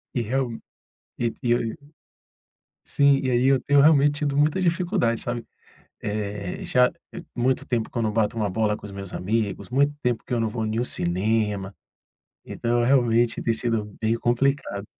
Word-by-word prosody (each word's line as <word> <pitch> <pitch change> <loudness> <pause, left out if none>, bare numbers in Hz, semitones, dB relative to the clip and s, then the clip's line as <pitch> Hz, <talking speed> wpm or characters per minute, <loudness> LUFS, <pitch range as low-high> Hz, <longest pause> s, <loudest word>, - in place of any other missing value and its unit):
E 120 - +1
real 125 +2 -1 0.7
e 120 -1 -1
eu 120 -1 +2 1.2
sim, 140 -1 +3
e 130 - 0
aí 120 +1 +2
eu 135 -1 +4
tenho 145 0 +3
realmente 145 -1 +5
tido 145 -2 -1
muita 150 +5 +2
dificuldade, 175 - +1
sabe, 120 -1 -4 0.6
eh, 105 -2 -4
já 125 0 +3 0.2
et 175 - -7
muito 125 +2 0
tempo 115 -3 -1
que 120 - -4
eu - - +1
não 110 - +1
bato 110 +1 0
uma 105 -2 0
bola 105 +2 0
com - - -10
os - - -9
meus 100 -1 -8
amigos, 105 +2 -2
muito 140 +3 +2
tempo 120 -2 -1
que - - -7
eu 120 - +1
não 115 - 0
vou 110 0 -3
em 110 +2 -1
um 120 - 0
cinema, 100 +1 0 0.7
então 120 0 -1
eu 120 - +2
realmente 120 -3 +3
tem 115 - +1
sido 110 -3 -2
meio 115 +1 +1
complicado. 120 -4 0
120 Hz, 180 wpm, -24 LUFS, 110-135 Hz, 1.2 s, realmente